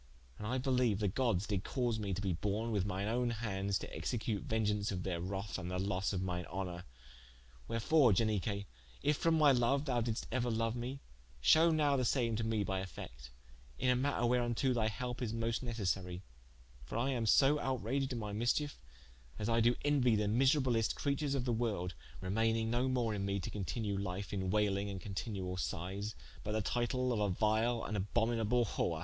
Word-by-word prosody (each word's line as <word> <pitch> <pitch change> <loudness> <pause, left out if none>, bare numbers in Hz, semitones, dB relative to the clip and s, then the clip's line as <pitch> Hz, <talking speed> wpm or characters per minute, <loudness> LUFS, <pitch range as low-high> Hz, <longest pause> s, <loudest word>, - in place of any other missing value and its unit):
And 105 - -4
I 125 +4 0
beliue 125 -5 +2
the 105 0 0
gods 105 -2 +1
did 100 -3 -1
cause 120 -4 -1
me 100 -2 -2
to 95 +2 -2
be 95 -3 +1
borne 105 +6 -1
with 100 -3 0
mine 100 +1 -2
owne 120 +2 +1
hands 100 -4 -1
to - - -7
execute 110 -4 -2
vengeaunce 105 -2 0
of 90 -2 -3
their 85 -3 -2
wrath 95 +3 -3
and 90 - -5
the 90 - -2
losse 95 0 0
of 95 -2 -1
mine 90 -2 -3
honour. 90 -2 -5 0.8
Wherefore, 120 +3 +4
Ianique, 100 0 +1 0.4
if 150 +1 +3
from 165 -1 +2
my 150 -2 +6
youth 125 - +3 0.3
thou 125 -4 +1
diddest 115 -1 -2
euer 125 -2 0
loue 115 0 +1
me, 125 +4 -5 0.4
shew 160 - +6
now 150 -3 +3
the 130 - +1
same 120 -2 +1
to 115 - -1
me 110 -2 0
by 95 -1 -1
effect, 60 -9 -8 0.5
in 125 - +2
a - - +3
matter 130 -1 +1
whereunto 120 +1 +2
thy 115 -3 +1
helpe 125 +4 -4
is 115 -3 -2
moste 115 0 -1
necessary: 95 -6 -2 0.6
for - - -5
I 130 +4 +1
am 120 -4 -1
so 140 +6 +5
outraged 130 +1 -1
in 125 - -2
my 105 -2 -4
mischiefe, 120 +7 0 0.6
as 105 +1 -2
I 115 0 +3
do 120 +2 +4
enuie 130 -6 +4
the 105 0 +1
miserablest 125 0 +3
creatures 140 0 0
of 130 -2 -1
the 120 - +1
world, 105 -6 -1 0.3
remayning 110 +3 +1
no 120 +2 +1
more 120 -4 +1
in 100 -1 -2
me 100 0 0
to - - -5
continue 100 +1 -2
life 100 +1 -4
in 95 -2 -1
wailing 100 0 +1
and 95 -1 -4
continuall 95 -1 -4
sighes, 95 +6 -3 0.3
but 105 - -3
the 110 - +1
title 125 +2 0
of 110 - -1
a 105 -1 +2
vile 110 +4 +1
and 105 - -3
abhominable 115 +3 +1
whore. - - -1
110 Hz, 195 wpm, -35 LUFS, 100-125 Hz, 0.8 s, my